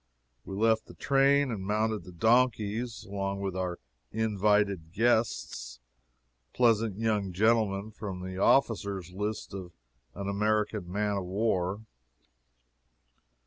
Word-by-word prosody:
We 95 - -6
left 110 +2 +2
the - - -13
train 140 0 +3
and 100 -4 -4
mounted 110 +2 0
the 90 - -10
donkeys, 115 +2 +1
along 100 0 -3
with 95 -2 -3
our 90 -2 -2 0.3
invited 105 -5 +1
guests 110 - 0 0.8
pleasant 115 -4 +3
young 105 -4 0
gentlemen 110 0 +2
from 100 -4 -6
the 95 0 -6
officers' 100 -7 +2
list 105 +2 -4
of 95 -3 -7 0.4
an 100 -1 -5
American 105 -2 0
man 105 +1 0
of 95 - -3
war. 95 0 0
105 Hz, 115 wpm, -29 LUFS, 95-110 Hz, 0.8 s, train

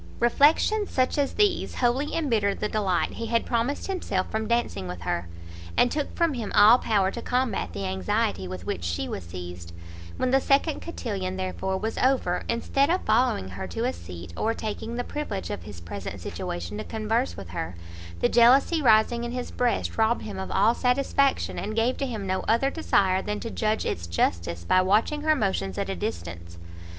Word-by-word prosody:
Reflections 310 - +3
such 255 -1 +1
as 280 - 0
these 415 -4 +1
wholly 255 +4 +1
embittered 225 -11 +1
the 210 - 0
delight 200 -5 0
he 230 - -5
had 230 +1 +1
promised 240 +4 -1
himself 355 - -2
from 220 0 -2
dancing 235 - 0
with 90 -1 -6
her, 85 0 -2 0.5
and 245 - +4
took 295 -1 -3
from 335 -3 +2
him 235 -5 -4
all 215 +4 +8
power 195 -3 +1
to 235 - -6
combat 245 - -1
the 100 +2 -4
anxiety 95 -1 -1
with 90 -1 -7
which 85 - -3
she 85 +1 -2
was 95 - -5
seized; 90 0 -8 0.4
when 255 - 0
the 270 +1 +4
second 285 +3 +2
cotillon, 195 - -4
therefore, 190 0 -2
was 220 +3 -3
over, 255 -9 +1
instead 275 +4 +1
of 360 +2 +2
following 215 - +2
her 95 0 -6
to 85 - -3
a - - 0
seat, 85 0 -9
or 225 +1 0
taking 220 +2 -4
the 245 - -2
privilege 245 -10 -4
of 205 - -4
his 105 -5 -9
present 85 +3 -7
situation 85 +4 -5
to - - -3
converse 225 - -1
with 95 -3 -8
her, 85 0 -4 0.5
the - - +5
jealousy 260 +7 +5
rising 235 -1 +4
in 240 - -3
his 250 -1 -4
breast 245 -2 -1
robbed 225 +2 +2
him 200 -3 -6
of 190 - -5
all 210 +4 +3
satisfaction, 270 +2 +1
and 215 +2 -4
gave 230 +3 +2
to 275 - -2
him 220 -5 -4
no 185 0 0
other 235 +5 +3
desire 190 - +2
than 210 +1 -3
to 230 - -5
judge 215 -1 0
its 85 0 -3
justice 85 0 -1
by 185 - +4
watching 215 +10 +2
her 310 0 +3
motions 190 - -1
at - - -2
a - - -3
distance. 85 0 -5
215 Hz, 195 wpm, -26 LUFS, -, 0.5 s, all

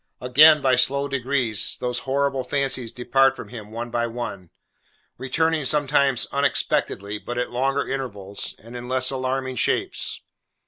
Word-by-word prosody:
Again, 150 +4 +6
by 130 -2 +3
slow 140 +3 +2
degrees, 130 -5 0
these 125 -1 -2
horrible 135 0 -1
fancies 135 -3 -1
depart 135 +2 +2
from - - -9
him 110 -4 -9
one 115 +2 -6
by 120 0 0
one: 115 -7 -6 0.7
returning 160 +4 0
sometimes, 140 -1 +2
unexpectedly, 100 +2 0
but 120 +3 -6
at 125 - -2
longer 135 +3 0
intervals, 105 -7 -4
and 115 +2 -13
in 120 0 -7
less 130 0 +2
alarming 130 0 -2
shapes. - - 0
130 Hz, 140 wpm, -23 LUFS, 120-135 Hz, 0.7 s, Again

